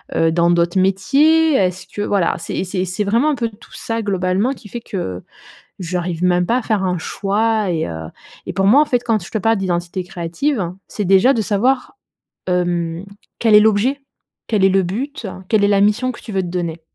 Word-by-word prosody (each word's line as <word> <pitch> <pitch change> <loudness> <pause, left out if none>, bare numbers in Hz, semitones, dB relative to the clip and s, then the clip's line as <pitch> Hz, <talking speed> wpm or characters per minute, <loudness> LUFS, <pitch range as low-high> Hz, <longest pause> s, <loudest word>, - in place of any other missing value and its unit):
heu, 165 0 +3
dans 170 +1 +2
d'autres 175 +2 +2
métiers? 285 +12 +3
Est-ce 185 -3 0
que 205 - -6
voilà, 195 -5 +1
c'est 170 - -3
c'est 185 0 -2
c'est 185 +3 -2
vraiment 235 +9 +2
un - - 0
peu 235 -2 -2
tout 210 +1 -18
ça 225 0 -3
globalement 195 +5 0
qui 210 - -14
fait 240 - -5
que 95 - -5 0.6
j'arrive 180 -1 -3
même 180 0 +3
pas 240 +5 +2
à 255 - -3
faire 210 -4 0
un 180 -2 0
choix 210 +3 0
et, 165 -2 -1
heu 80 -1 -6 0.4
et - - -4
pour 195 +1 0
moi, 265 +8 +6
en 305 - 0
fait, 245 -4 +1
quand 220 -7 0
je - - -11
te 220 - -1
parle 225 +2 +2
d'identité 180 -1 -2
créative, 175 - -2 0.2
c'est 210 - -4
déjà 195 +8 +5
de 230 - 0
savoir, 250 - 0 0.5
hem, 175 0 -1 0.3
quel 225 -2 +3
est - - +10
l'objet, 220 +6 +2 0.5
quel 205 -4 +2
est - - +5
le 195 0 +3
but, 235 - -4 0.2
quelle 215 -2 +3
est - - +3
la 200 -1 +3
mission 220 +5 +2
que - - -12
tu 220 - -9
veux 190 -1 0
te - - -5
donner. 170 -2 -4
195 Hz, 210 wpm, -18 LUFS, 180-225 Hz, 0.6 s, est